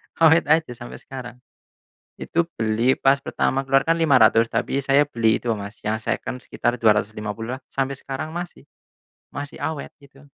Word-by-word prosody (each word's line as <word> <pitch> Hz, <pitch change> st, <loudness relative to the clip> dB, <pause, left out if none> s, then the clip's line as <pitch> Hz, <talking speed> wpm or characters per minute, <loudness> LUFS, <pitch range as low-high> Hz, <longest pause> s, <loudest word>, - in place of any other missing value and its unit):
Awet 165 Hz, -1 st, +5 dB
aja 160 Hz, -3 st, +3 dB
sampai 120 Hz, 0 st, -9 dB
sekarang. 125 Hz, -2 st, -9 dB, 0.8 s
Itu 170 Hz, -, 0 dB, 0.2 s
beli 115 Hz, +4 st, +2 dB
pas 140 Hz, +1 st, +3 dB
pertama 135 Hz, +1 st, 0 dB
keluar 135 Hz, +1 st, +2 dB
kan 165 Hz, -, +4 dB
Rp500.000, 120 Hz, -8 st, +4 dB
tapi 135 Hz, +4 st, -1 dB
saya 140 Hz, +2 st, +3 dB
beli 115 Hz, -5 st, +1 dB
itu, -, -, -14 dB
Mas, 100 Hz, 0 st, -8 dB
yang 110 Hz, -, +1 dB
seken 125 Hz, -, -3 dB
sekitar 120 Hz, +1 st, -1 dB
Rp250.000-an. 110 Hz, +3 st, 0 dB
Sampai 135 Hz, 0 st, -1 dB
sekarang 140 Hz, +5 st, -6 dB
masih. 175 Hz, -4 st, -7 dB, 0.7 s
Masih 145 Hz, +2 st, -6 dB
awet, 145 Hz, 0 st, -4 dB
itu. 140 Hz, 0 st, -19 dB
135 Hz, 150 wpm, -23 LUFS, 115-145 Hz, 0.8 s, Awet